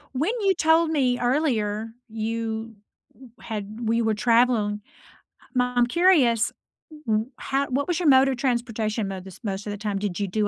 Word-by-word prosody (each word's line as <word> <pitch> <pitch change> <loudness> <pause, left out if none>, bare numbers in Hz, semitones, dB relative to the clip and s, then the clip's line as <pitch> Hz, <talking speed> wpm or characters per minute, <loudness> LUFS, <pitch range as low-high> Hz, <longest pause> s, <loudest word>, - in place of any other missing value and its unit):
When 310 - +1
you 390 -2 +3
told 320 0 +3
me 255 -5 +1
earlier 230 -5 0 0.2
you 225 0 -4 0.4
w 260 -2 -16
had 210 -3 -5 0.3
we 230 0 +2
were 220 -1 +1
traveling 230 -2 +2 0.8
I'm 250 -1 +2
curious, 280 - +4 0.5
wh 215 0 +2 0.3
how 275 +1 +1
what 275 +3 0
was 350 0 0
your 340 - 0
mode 270 0 +6
of 260 - -2
transportation 230 -4 -1
mo 190 -1 -5
this 190 0 -12
most 200 0 -4
of - - -3
the 205 +1 -7
time? 200 -1 -1
Did 200 -2 -3
you 200 - 0
do 210 +1 0
230 Hz, 170 wpm, -24 LUFS, 215-265 Hz, 0.8 s, mode